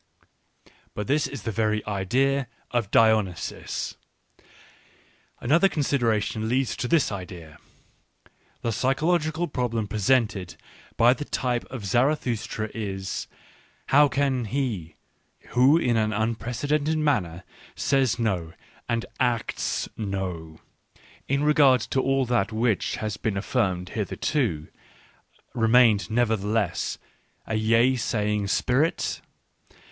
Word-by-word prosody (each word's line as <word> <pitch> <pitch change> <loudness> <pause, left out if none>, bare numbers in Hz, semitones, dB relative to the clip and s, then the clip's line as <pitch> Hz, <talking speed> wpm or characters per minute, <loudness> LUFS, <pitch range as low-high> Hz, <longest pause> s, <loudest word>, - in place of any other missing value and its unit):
But 105 - -3
this 145 +3 +1
is 135 -7 -8
the 110 - -2
very 110 0 0
idea 125 +7 0 0.2
of 120 -5 0
Dionysus. 110 -6 +1 1.4
Another 165 +10 +3
consideration 115 - 0
leads 130 +1 0
to 125 - -2
this 160 -2 +2
idea. 90 -5 -8 1.0
The 115 - 0
psychological 155 +7 0
problem 115 -6 -2
presented 105 -4 0 0.4
by 120 +2 +6
the 145 - -5
type 125 -4 -2
of 125 -6 -7
Zarathustra 120 -2 0
is, 95 -3 -4 0.6
how 145 +2 +6
can 135 -3 0
he, 105 - -3 0.5
who 130 +6 +5
in 125 -8 +1
an 110 -1 +1
unprecedented 125 +8 -1
manner 100 - 0 0.3
says 135 -5 +1
no, 95 -8 -1 0.4
and 115 -1 0
acts 120 -3 -1
no, 90 -6 -5 0.7
in 140 +2 +1
regard 145 -4 +5
to 130 - -1
all 135 0 +1
that 120 -3 0
which 110 -1 0
has 105 -1 -4
been 105 -3 -2
affirmed 95 -4 -1
hitherto, 105 - -1 0.9
remain 115 -2 +5
nevertheless 110 -4 0 0.5
a - - -4
yea 115 +4 +3
saying 105 -4 -1
spirit 130 - 0
115 Hz, 105 wpm, -25 LUFS, 105-135 Hz, 1.4 s, by